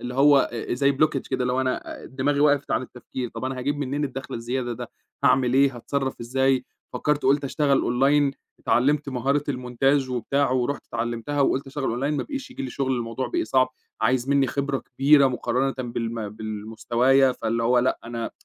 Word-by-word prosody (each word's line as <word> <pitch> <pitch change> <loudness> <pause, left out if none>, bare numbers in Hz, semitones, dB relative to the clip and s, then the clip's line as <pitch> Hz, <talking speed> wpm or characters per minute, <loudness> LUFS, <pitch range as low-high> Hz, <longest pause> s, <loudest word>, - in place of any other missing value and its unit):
اللي 125 0 -5
هو 140 0 +5 0.2
زي 140 +3 +2
blockage 140 -1 0
كده - - 0
اللي 125 0 0
هو 130 - +1
أنا 130 -1 -3
دماغي 140 +2 -1
وقَفِت 145 -1 +3
عن - - +1
التفكير، 125 0 -6
طب 115 +2 -7
أنا 130 0 -3
هاجيب 145 +3 -1
منين 145 +1 -2
الدخل 135 0 -6
الزيادة 120 +1 -3
ده، 120 +1 -7 0.3
هاعمل 125 -1 +4
إيه، 135 -1 +4
هاتصرف 135 +2 -3
إزاي، 130 +2 +1 0.3
فكَّرت 150 -1 0
وقُلت 140 +2 +3
أشتغل 140 0 +2
أونلاين 140 +3 +2 0.3
اتعلمت 145 +4 +2
مهارة 135 +3 0
المونتاج 130 +1 +1
وبتاع، 135 +3 0
ورُحت 130 +2 -1
اتعلِّمتها 120 +4 -3
وقُلت 135 0 +1
أشتغل 135 0 -5
أونلاين 140 +6 -1
ما - - -1
بقيش 275 -3 -6
ييجي - - -6
لي 130 - -4
شغل 130 0 -1
الموضوع 115 +2 -3
بقى 345 -1 -1
صعب، 130 - +2 0.3
عايز 125 +1 +1
مني 140 -1 +3
خبرة 140 0 -1
كبيرة 140 +2 +4
مقارنةً 130 +1 0
بالم 115 -3 -3
بالمستوايا، 115 +5 +1
فاللي 115 -1 -2
هو 125 +2 +3
لأ 125 +2 +1
أنا 115 -1 -4
130 Hz, 180 wpm, -24 LUFS, 120-140 Hz, 0.3 s, هو